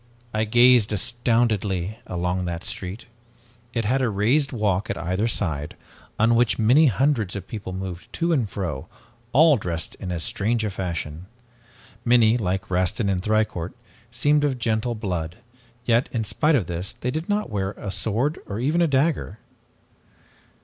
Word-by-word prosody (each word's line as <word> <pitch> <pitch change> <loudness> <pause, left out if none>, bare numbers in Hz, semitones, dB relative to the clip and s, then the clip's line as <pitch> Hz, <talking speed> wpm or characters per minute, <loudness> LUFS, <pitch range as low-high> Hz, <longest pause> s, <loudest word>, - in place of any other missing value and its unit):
"I 110 +1 +1
gazed 120 0 +5
astoundedly 110 -3 0
along 90 +1 -1
that 85 0 -4
street. 95 +5 -5 0.7
It 115 -2 -2
had 130 +5 +2
a 125 - +2
raised 120 +8 +2
walk 105 -5 0
at - - -2
either 90 +6 -1
side, 80 -10 -2 0.4
on 115 +2 +4
which 120 0 +3
many 125 +8 +5
hundreds 125 -5 +1
of 95 -2 -6
people 105 -4 -6
moved 95 -2 -6
to 170 0 +1
and 120 -9 +1
fro, 85 -10 -4 0.4
all 155 +1 +6
dressed 85 -4 -4
in 95 - -5
as 85 -2 -3
strange 115 0 0
a 105 - -2
fashion. 85 -2 -4 0.8
Many, 120 -2 +5
like 95 -3 -2
Rastin 95 +4 +1
and 95 -2 0
Thicourt, 105 -4 0 0.3
seemed 145 +5 +2
of 140 -3 +1
gentle 115 0 0
blood, 90 -6 -3 0.5
yet, 120 +1 +2
in 115 -2 -1
spite 150 +8 +2
of 115 -10 +1
this, 85 +2 -4
they 125 - -3
did 160 +6 -4
not 205 - 0
wear 100 -1 -2
a 100 - -6
sword 120 +10 0
or 100 +2 -4
even 150 +8 +1
a 170 - +4
dagger. 140 - 0
110 Hz, 160 wpm, -24 LUFS, 95-120 Hz, 0.8 s, all